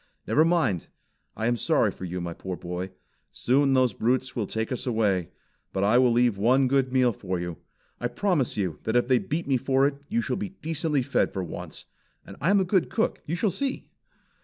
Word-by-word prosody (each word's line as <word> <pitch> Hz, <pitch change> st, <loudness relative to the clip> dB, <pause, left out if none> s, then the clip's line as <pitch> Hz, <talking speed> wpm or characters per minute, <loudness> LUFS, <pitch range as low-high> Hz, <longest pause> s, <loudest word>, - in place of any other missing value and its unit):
"Never 155 Hz, -, +4 dB
mind. 160 Hz, -, +1 dB, 0.5 s
I 110 Hz, -, -2 dB
am 120 Hz, +1 st, +2 dB
sorry -, -, +2 dB
for 95 Hz, -, -8 dB
you, 90 Hz, +1 st, -4 dB
my 85 Hz, -1 st, -4 dB
poor 95 Hz, +1 st, -6 dB
boy. 90 Hz, +1 st, -5 dB, 0.4 s
Soon 135 Hz, +2 st, +2 dB
those 130 Hz, -4 st, +3 dB
brutes 125 Hz, +4 st, 0 dB
will 110 Hz, -4 st, -1 dB
take 110 Hz, +4 st, -3 dB
us 125 Hz, -, -3 dB
away, 105 Hz, -7 st, +1 dB, 0.4 s
but 95 Hz, -, 0 dB
I 110 Hz, +5 st, +4 dB
will 125 Hz, -1 st, +4 dB
leave 120 Hz, -3 st, +2 dB
one 130 Hz, +5 st, +4 dB
good 130 Hz, -1 st, +1 dB
meal 125 Hz, -2 st, +3 dB
for 95 Hz, -2 st, -4 dB
you. 85 Hz, -1 st, -5 dB, 0.4 s
I 120 Hz, -, 0 dB
promise 140 Hz, -, 0 dB
you 90 Hz, -7 st, -2 dB
that 110 Hz, -, -2 dB
if 120 Hz, 0 st, +3 dB
they 130 Hz, -1 st, +4 dB
beat 160 Hz, +2 st, -3 dB
me 135 Hz, -2 st, +3 dB
for 135 Hz, +2 st, +2 dB
it 140 Hz, 0 st, -1 dB
you 230 Hz, -, +1 dB
shall -, -, -2 dB
be 200 Hz, 0 st, -4 dB
decently 155 Hz, -3 st, -1 dB
fed -, -, +1 dB
for 95 Hz, -, -3 dB
once. 85 Hz, -, -8 dB, 0.4 s
And -, -, -10 dB
I 165 Hz, -, +2 dB
am 200 Hz, 0 st, +5 dB
a -, -, +3 dB
good 185 Hz, -1 st, +1 dB
cook; 225 Hz, -, -1 dB
you 165 Hz, -, -1 dB
shall 200 Hz, +3 st, +1 dB
see!" 275 Hz, +4 st, -3 dB
125 Hz, 215 wpm, -26 LUFS, 100-145 Hz, 0.5 s, am